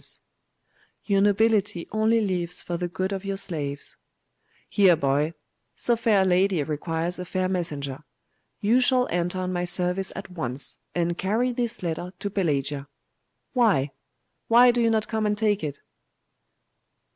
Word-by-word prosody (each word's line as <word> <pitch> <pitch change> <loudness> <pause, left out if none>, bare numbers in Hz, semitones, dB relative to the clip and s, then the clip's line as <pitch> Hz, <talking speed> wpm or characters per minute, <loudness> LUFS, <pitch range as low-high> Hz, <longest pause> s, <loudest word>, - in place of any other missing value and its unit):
'Your 200 -2 +2
nobility 205 -3 +2
only 220 +2 +2
lives 180 -4 -2
for 175 - -3
the 175 +1 -2
good 185 +3 -2
of 195 0 -4
your 195 -1 -3
slaves.' 150 -8 -4 0.7
'Here, 190 -4 +5
boy! 145 +2 0 0.4
So 240 - +2
fair 220 -4 +3
a - - 0
lady 185 -2 +2
requires 165 +4 -2
a - - -3
fair 185 +1 -1
messenger. 150 -7 -2 0.6
You 230 +5 +4
shall 250 0 +3
enter 175 +1 -1
on 185 0 -2
my 175 0 -1
service 180 +2 +1
at - - -7
once, 140 -6 -2 0.2
and 175 0 0
carry 225 +6 +1
this 240 -4 -3
letter 175 +2 -3
to 200 +2 -4
Pelagia. 145 -7 -1 0.7
Why? 200 - +3 0.6
why 245 +2 +7
do 240 0 0
you 230 - +3
not 220 -1 +1
come 220 -2 0
and 210 0 0
take 210 -3 +1
it? 145 -2 -3
185 Hz, 150 wpm, -25 LUFS, 170-210 Hz, 0.7 s, why